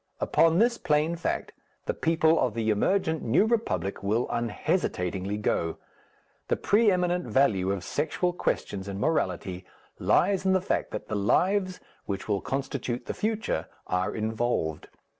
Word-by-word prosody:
Upon 165 0 +3
this 235 +3 +3
plain 155 0 +1
fact 170 - -2 0.3
the - - 0
people 160 0 +3
of 120 -4 0
the 110 -1 +1
emergent 160 - +1
New 120 - +3
Republic 215 - -1
will 110 +5 0
unhesitatingly 100 -4 -1
go. 85 -5 -1 0.7
The - - +2
pre 215 +2 +3
eminent 180 -1 +1
value 105 -6 +2
of 100 -3 -3
sexual 160 - -1
questions 100 - -2
in 100 0 -5
morality 95 - -1 0.4
lies 195 -2 +3
in 190 0 +3
the 190 - +4
fact 185 - -1
that - - -6
the 110 - -5
lives 185 - +1 0.3
which 100 -2 -4
will 100 -2 0
constitute 130 -2 -3
the - - -3
future 215 - -2 0.2
are 90 0 -1
involved. 110 -7 -1
125 Hz, 145 wpm, -27 LUFS, -, 0.7 s, the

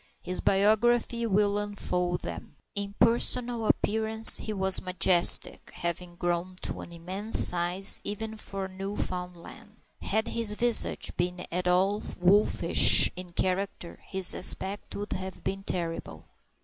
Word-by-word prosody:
His 180 0 0
biography 230 +4 0
will 205 0 -1
unfold 180 -4 -4
them. - - -10 0.2
In 200 0 -7
personal 235 0 -1
appearance 220 +1 +5
he 215 - -6
was 190 -2 +3
majestic, 180 -1 +4
having 175 0 -6
grown 175 +1 -5
to - - -5
an - - -13
immense 185 +6 0
size 180 +3 -1
even 220 +2 -6
for 195 -2 -7
a - - -7
Newfoundland. 185 -2 -8 0.3
Had 220 +1 -3
his 225 -3 0
visage 240 +1 +2
been 180 0 -4
at 180 +1 -4
all 190 +4 0 0.2
wolfish 195 +4 +4
in 180 -1 -11
character, 185 -1 -4
his 190 -2 +1
aspect 195 +2 -2
would 205 +1 -7
have 190 0 -9
been 195 0 -6
terrible. 165 - -7
190 Hz, 130 wpm, -25 LUFS, 180-210 Hz, 0.3 s, appearance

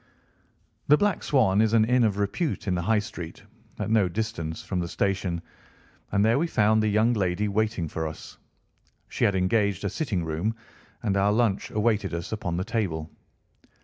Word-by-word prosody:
The 150 - +6
Black 205 +2 +1
Swan 110 -8 +3
is 110 0 +2
an 110 -1 +5
inn 125 +1 +3
of 105 -3 +1
repute 105 - -2
in 95 - +1
the 90 - 0
High 110 +5 +2
Street, 100 -6 -6 0.3
at - - -3
no 105 -5 +3
distance 85 -6 -4
from 95 - -2
the 85 - -2
station, 90 -1 -1 0.7
and 100 +1 +3
there 115 +4 +3
we 170 - +1
found 110 -6 +3
the 110 - +1
young 110 +3 +3
lady 100 -1 0
waiting 105 -4 0
for 80 +1 -3
us. 80 - -10 0.7
She - - 0
had 100 - +2
engaged 100 +1 +1
a 100 - -1
sitting 100 - -2
room, 80 +8 -2 0.5
and 100 -3 0
our 100 +1 +3
lunch 110 -1 +1
awaited 105 -5 0
us 85 0 -5
upon 90 -6 -2
the 90 - -1
table. 80 -9 -2
105 Hz, 180 wpm, -26 LUFS, 90-110 Hz, 0.7 s, The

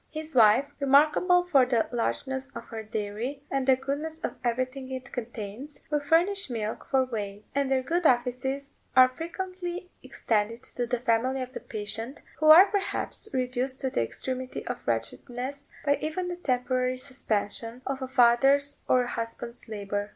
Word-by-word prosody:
His 315 0 -6
wife, 230 +2 +6
remarkable 300 +6 +4
for 290 -7 +4
the 245 -3 +1
largeness 265 +3 -2
of - - -6
her 225 -2 -5
dairy, 220 +6 -4
and 270 -1 0
the 265 - +7
goodness 290 +4 -4
of - - -2
everything 255 +2 -2
it 255 -1 -6
contains, 240 +3 -6
will 295 - +2
furnish 340 +6 +2
milk 220 -3 -4
for 265 -1 +3
whey; 205 -4 -5
and 280 -1 +1
their 260 -1 +2
good 335 +4 +2
offices 260 +3 0 0.2
are 255 0 +9
frequently 360 +4 -5
extended 225 +1 -1
to 245 -1 -4
the 245 0 -1
family 255 +2 +1
of 255 0 -10
the - - -5
patient, 225 +5 -6 0.2
who 310 - +2
are, 325 +5 +11
perhaps, 405 -1 -1
reduced 255 0 -2
to 265 - -1
the - - +1
extremity 255 - -4
of - - -4
wretchedness, 245 - -3 0.2
by 285 0 +3
even 355 +4 -2
the 355 - -3
temporary 255 -5 0
suspension 235 -2 -2
of 270 0 -3
a 260 - -3
father's 270 +3 +4
or 250 -1 +4
a - - -4
husband's 235 0 -6
labour. 205 -1 -3
255 Hz, 165 wpm, -28 LUFS, 235-285 Hz, 0.2 s, are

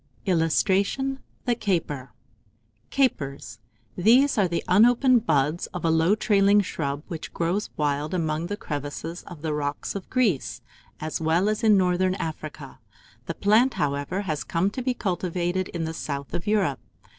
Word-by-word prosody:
[Illustration: 195 - +1 0.3
THE 245 - +2
CAPER.] 165 - -2 0.8
CAPERS. 140 - -1 0.4
These 245 +9 +4
are 195 - +4
the 170 -1 -2
unopened 240 +4 +4
buds 150 +2 +1
of 175 - -3
a 165 - +3
low 165 +5 +3
trailing 205 -1 +4
shrub, 145 -6 -3
which 165 -3 -6
grows 175 +5 -1
wild 150 +3 -1
among 160 -1 -1
the 205 - -4
crevices 150 +3 -5
of 165 -3 -10
the 155 -2 -1
rocks 145 0 -3
of 195 -2 -7
Greece, 220 - 0 0.4
as 155 +1 -4
well 165 +5 +2
as 215 +2 -1
in 215 -2 +6
northern 185 0 +2
Africa: 155 -5 -6 0.5
the 165 - -3
plant, 225 +6 +3
however, 145 +6 -1
has 155 -7 -3
come 180 +4 0
to 255 - -4
be 250 0 -1
cultivated 180 -2 -1
in 170 -2 -4
the 160 - -4
south 140 -5 -5
of 175 - -4
Europe. 195 - +1
175 Hz, 155 wpm, -25 LUFS, 155-205 Hz, 0.8 s, in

